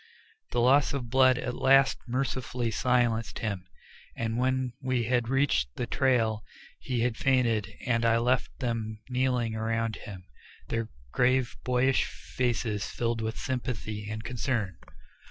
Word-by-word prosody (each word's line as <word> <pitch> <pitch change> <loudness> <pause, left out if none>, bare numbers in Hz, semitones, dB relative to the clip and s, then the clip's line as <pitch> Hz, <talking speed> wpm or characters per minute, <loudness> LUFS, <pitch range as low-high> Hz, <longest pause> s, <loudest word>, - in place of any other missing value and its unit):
The 120 - 0
loss 135 +4 +4
of 120 -4 -5
blood 130 -1 +5
at 125 -1 -3
last 135 +2 +4
mercifully 125 -2 -1
silenced 120 -1 +1
him, 100 -5 -3 0.5
and 115 0 -2
when 130 -1 0
we 130 -2 0
had 120 0 +1
reached 125 - +1
the 125 - -2
trail 115 -4 +1 0.4
he 125 -3 -2
had 120 -1 0
fainted 120 -6 +2
and 115 -1 +1
I 115 0 +4
left 125 +2 +1
them 115 -4 -2
kneeling 125 -3 +1
around 115 0 -1
him, 95 -3 -9 0.5
their 115 -1 -2 0.2
grave 130 0 +2
boyish 125 +1 +2
faces 120 -4 -2
filled 115 -1 -1
with 110 +1 -3
sympathy 110 -5 -3
and 110 0 -5
concern. 115 -7 -2
120 Hz, 135 wpm, -28 LUFS, 110-130 Hz, 0.5 s, blood